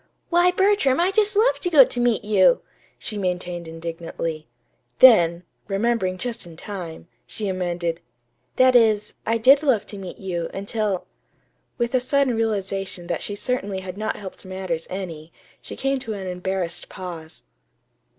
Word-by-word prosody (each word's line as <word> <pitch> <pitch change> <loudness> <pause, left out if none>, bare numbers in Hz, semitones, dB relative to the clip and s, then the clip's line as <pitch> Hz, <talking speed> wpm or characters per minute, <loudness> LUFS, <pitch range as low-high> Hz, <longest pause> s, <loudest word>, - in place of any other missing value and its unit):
"Why, 350 +1 +5
Bertram, 380 -7 +3
I 360 +3 +3
just 420 +1 +2
love 455 +4 +3
to 355 - -1
go 290 -6 +8
to 245 - -4
meet 240 -4 +1
you," 470 - +4 0.3
she 210 -2 -5
maintained 180 -2 -3
indignantly. 165 -1 -5 0.5
Then, 175 -9 +6 0.2
remembering 195 -2 0
just 235 -2 -5
in 165 -2 -13
time, 170 -4 -7 0.2
she 210 - -4
amended: 175 -3 -2 0.6
"That 255 0 +5
is, 215 -3 +4
I 225 +1 +2
did 270 +5 +6
love 265 -9 +2
to 205 - -8
meet 185 -2 -8
you, 175 -4 -3
until 200 -1 -2 0.4
" - - -45
With 235 0 -1
a 255 - +4
sudden 265 -1 +1
realization 195 -5 -2
that 170 -2 -3
she 205 - -3
certainly 205 -4 -2
had 185 -1 -7
not 215 +2 -2
helped 195 -2 -9
matters 185 -3 -4
any, 170 -4 -6 0.3
she - - -7
came 270 0 0
to 230 -4 -5
an 195 -2 -6
embarrassed 180 -1 -3
pause. 170 -4 -8
200 Hz, 160 wpm, -23 LUFS, 180-245 Hz, 0.6 s, go